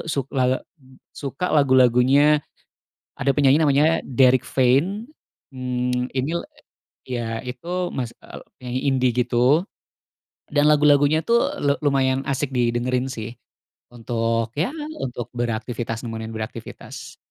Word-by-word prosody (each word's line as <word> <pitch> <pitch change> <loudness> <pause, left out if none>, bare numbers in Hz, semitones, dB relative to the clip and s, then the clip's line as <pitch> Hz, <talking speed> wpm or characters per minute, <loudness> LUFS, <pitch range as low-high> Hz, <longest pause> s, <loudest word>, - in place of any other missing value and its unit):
suk 140 -3 -2
eee, 130 0 +2 0.5
suka 140 +5 -4
lagu-lagunya, 135 +2 +4 0.7
ada 140 +2 +1
penyanyi 145 +2 +4
namanya 150 +2 +3
Derik 130 0 +3
Fein, 150 - +1 0.5
mmm, 125 -1 -2
ini, 135 +4 -2
eee, - - -8 0.5
ya, 120 -1 -3 0.2
itu, 175 +8 -3
mas 120 -3 -3
eee, - - -11 0.2
penyanyi 125 0 -3
indi, 130 -1 +2 0.2
gitu. 125 +7 +3 0.9
Dan 145 0 +3
lagu-lagunya, 150 +1 +4
tuh, 235 +6 +2
le 140 0 +1
lumayan 135 -1 +1
asik 140 0 -1
didengerin, 125 +1 0
sih, 120 -2 -6 0.6
untuk, 115 -1 -1
ya, 185 - 0 0.3
untuk 120 -2 -4
beraktivitas, 115 0 -3
nemenin 115 -1 -5
beraktivitas. 110 0 -8
130 Hz, 115 wpm, -22 LUFS, 120-145 Hz, 0.9 s, lagu-lagunya